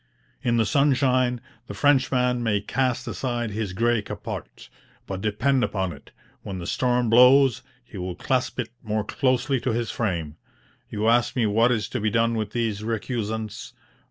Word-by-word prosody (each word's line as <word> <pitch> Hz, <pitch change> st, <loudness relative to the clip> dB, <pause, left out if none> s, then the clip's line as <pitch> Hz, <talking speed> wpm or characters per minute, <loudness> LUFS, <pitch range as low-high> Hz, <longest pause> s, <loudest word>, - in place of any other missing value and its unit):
In 120 Hz, -1 st, +1 dB
the 115 Hz, -, +3 dB
sunshine, 130 Hz, -2 st, +2 dB, 0.3 s
the -, -, -7 dB
Frenchman 130 Hz, -3 st, +2 dB
may 110 Hz, -3 st, +1 dB
cast 125 Hz, +4 st, -1 dB
aside 120 Hz, -3 st, -3 dB
his 105 Hz, -2 st, -3 dB
grey 115 Hz, +3 st, +1 dB
capote; -, -, -7 dB, 0.4 s
but, 95 Hz, -1 st, -5 dB
depend 125 Hz, +6 st, +1 dB
upon 95 Hz, -6 st, -1 dB
it, 70 Hz, -, -15 dB, 0.3 s
when 95 Hz, -, -6 dB
the 85 Hz, -, -6 dB
storm 125 Hz, +4 st, +1 dB
blows, 125 Hz, +2 st, +6 dB, 0.2 s
he 110 Hz, -5 st, -9 dB
will 90 Hz, 0 st, -4 dB
clasp 130 Hz, +4 st, -1 dB
it 120 Hz, -, -2 dB
more 110 Hz, -1 st, -2 dB
closely 130 Hz, +3 st, 0 dB
to 120 Hz, -1 st, -1 dB
his 115 Hz, 0 st, -2 dB
frame. 85 Hz, -9 st, -3 dB, 0.5 s
You 105 Hz, +1 st, -2 dB
ask 120 Hz, +1 st, +3 dB
me 120 Hz, -3 st, +2 dB
what 115 Hz, +4 st, +3 dB
is 110 Hz, -4 st, 0 dB
to 125 Hz, -, -3 dB
be 110 Hz, -, +1 dB
done 115 Hz, +1 st, +2 dB
with 110 Hz, -2 st, -2 dB
these 110 Hz, -2 st, -2 dB
recusants? 110 Hz, -1 st, -4 dB
115 Hz, 165 wpm, -24 LUFS, 105-125 Hz, 0.5 s, blows